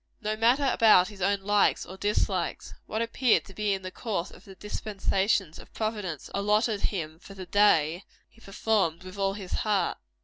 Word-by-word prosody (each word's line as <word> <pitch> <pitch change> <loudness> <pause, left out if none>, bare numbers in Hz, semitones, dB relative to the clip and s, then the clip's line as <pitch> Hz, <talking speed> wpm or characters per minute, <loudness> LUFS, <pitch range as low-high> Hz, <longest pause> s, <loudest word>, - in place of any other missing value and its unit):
No 215 -1 -2
matter 245 +6 +3
about 215 -6 +5
his 205 -3 -12
own 200 +1 +1
likes 205 +1 +2
or 185 - -9
dislikes 190 -3 -1
what 220 +1 -1
appeared 230 +1 +2
to 195 - -13
be 210 +1 -1
in 190 - -8
the 185 - -6
course 200 -5 -3
of - - -16
the 195 - -12
dispensations 195 -3 -1
of - - -15
Providence 210 -8 -3
allotted 210 +1 +1
him 160 -5 -3
for 195 +2 -13
the 190 -1 -7
day, 175 -3 +3 0.2
he 230 - -24
performed 195 -5 0
with 185 +2 -10
all 195 0 +1
his 195 -3 -8
heart. 205 -5 0
200 Hz, 180 wpm, -27 LUFS, 185-215 Hz, 0.2 s, about